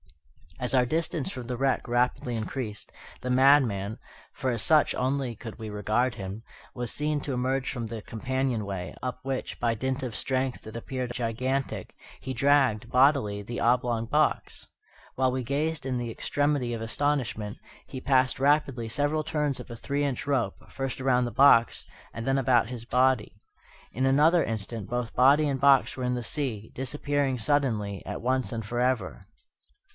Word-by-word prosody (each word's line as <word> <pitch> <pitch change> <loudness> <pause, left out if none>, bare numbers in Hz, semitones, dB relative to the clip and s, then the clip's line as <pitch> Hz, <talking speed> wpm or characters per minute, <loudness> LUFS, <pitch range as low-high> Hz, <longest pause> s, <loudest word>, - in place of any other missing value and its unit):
As 125 +1 -1
our 125 -1 +4
distance 155 +1 -1
from 125 -2 -7
the 125 -1 -3
wreck 135 0 0
rapidly 120 0 0
increased, 110 -1 -4 0.3
the 125 - -2
madman 125 -6 +4 0.4
(for 130 - -2
as 115 -2 -2
such 155 +2 +4
only 130 -2 -1
could 115 -1 -9
we 110 -1 -6
regard 110 +4 0
him) 100 +1 -6 0.3
was 120 -2 -4
seen 150 0 -1
to 140 - -3
emerge 130 +1 -1
from 120 -3 -4
the 110 0 -6
companionway, 110 - -3
up 125 -1 -4
which, 135 -1 -4
by 120 -1 +1
dint 130 +4 -2
of 125 -4 -4
strength 130 -1 -1
that 110 - -10
appeared 125 +1 -4
gigantic, 130 +3 -2 0.2
he 130 - -5
dragged, 135 -4 +2
bodily, 125 -6 +3
the 120 +4 -5
oblong 120 -1 +2
box. - - 0 0.5
While 130 -1 +2
we 130 0 -2
gazed 145 +4 -1
in 130 -2 -1
the 120 -1 -3
extremity 145 -1 0
of 115 - -4
astonishment, 115 -4 -1 0.3
he 130 - -7
passed 130 -1 +2
rapidly 135 -4 +2
several 145 +4 0
turns 150 -5 -1
of 125 - -9
a 120 - -6
three 140 +5 -2
inch 135 -4 -2
rope, 130 -8 +1
first 135 -2 -4
around 125 -1 +3
the 120 - -4
box 125 -4 +5 0.3
and 115 - -5
then 135 0 +2
around 125 -3 +3
his 120 -2 -7
body. 125 -4 +1 0.5
In 130 +3 -1
another 155 +6 +5
instant 110 -1 -4
both 120 -1 -3
body 140 +4 +5
and 135 -2 -1
box 140 -1 +5
were 130 - -5
in 125 0 0
the 120 - -3
sea, 115 -4 -3
disappearing 140 0 -1
suddenly, 110 -8 0
at - - -5
once 130 +2 0
and 115 -3 -4
forever. 120 - -1
125 Hz, 170 wpm, -27 LUFS, 115-135 Hz, 0.5 s, box